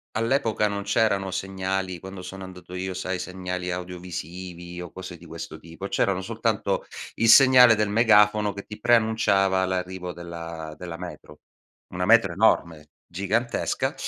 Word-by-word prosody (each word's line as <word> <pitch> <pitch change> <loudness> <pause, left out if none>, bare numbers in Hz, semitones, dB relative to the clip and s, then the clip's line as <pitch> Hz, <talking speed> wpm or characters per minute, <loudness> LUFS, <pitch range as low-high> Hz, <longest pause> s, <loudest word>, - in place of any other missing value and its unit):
All'epoca 115 -2 +1
non 100 -1 -3
c'erano 100 -2 +1
segnali, 95 -1 -3
quando 95 +1 -9
sono 95 +1 -8
andato 90 -1 -11
io, 95 +1 -3
sai 95 0 -3
segnali 90 -1 -4
audiovisivi 90 0 -7
o 90 -2 -7
cose 95 - -8
di - - -16
questo - - -8
tipo, 85 +4 -8
c'erano 95 -1 0
soltanto 95 - -1 0.3
il 115 - +1
segnale 125 -1 +8
del 105 -1 0
megafono 105 -2 +4
che 100 - -7
ti 105 - -10
preannunciava 105 -5 +3
l'arrivo 90 -1 -3
della 85 -2 -7
della 85 -2 -7
metro. 85 -4 -10 0.5
Una 90 0 -3
metro 110 -3 +5
enorme, 85 -6 +1 0.2
gigantesca, 100 - -1
95 Hz, 140 wpm, -25 LUFS, 90-105 Hz, 0.5 s, segnale